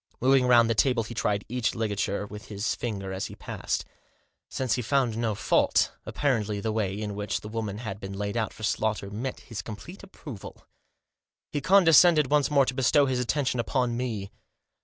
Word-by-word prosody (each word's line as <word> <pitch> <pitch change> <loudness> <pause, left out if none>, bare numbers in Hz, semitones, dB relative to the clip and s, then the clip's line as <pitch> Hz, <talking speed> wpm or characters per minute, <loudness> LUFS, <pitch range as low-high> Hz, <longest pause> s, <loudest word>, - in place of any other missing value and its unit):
Moving 130 0 +4
round 120 -2 +6
the 115 - +2
table, 120 +1 +2
he 115 - -8
tried 105 -2 -1
each 125 -1 -1
ligature 105 -2 -1
with 105 +1 -10
his 100 0 -2
finger 100 -5 -4
as 95 - -3
he - - -10
passed. - - -3 0.6
Since 130 -3 -1
he 125 - 0
found 125 -1 +1
no 115 -2 -1
fault, - - +2 0.2
apparently 110 -8 0
the 110 +2 -2
way 105 -2 -1
in 105 -1 -3
which 100 0 -3
the - - -8
woman 110 -2 -4
had 105 -3 -6
been 95 -1 -7
laid 100 +1 -3
out 115 -2 -1
for 110 - -12
slaughter 105 -2 -1
met 125 +6 -3
with - - -17
his 115 -5 -6
complete 110 - -9
approval. 145 - -10 0.9
He 145 - -2
condescended 165 -3 +6
once 150 -2 +3
more 140 -2 +4
to 130 - -2
bestow 135 +2 +3
his 130 -2 0
attention 125 0 0
upon 120 0 0
me. 115 -6 -3
115 Hz, 190 wpm, -27 LUFS, 105-130 Hz, 0.9 s, round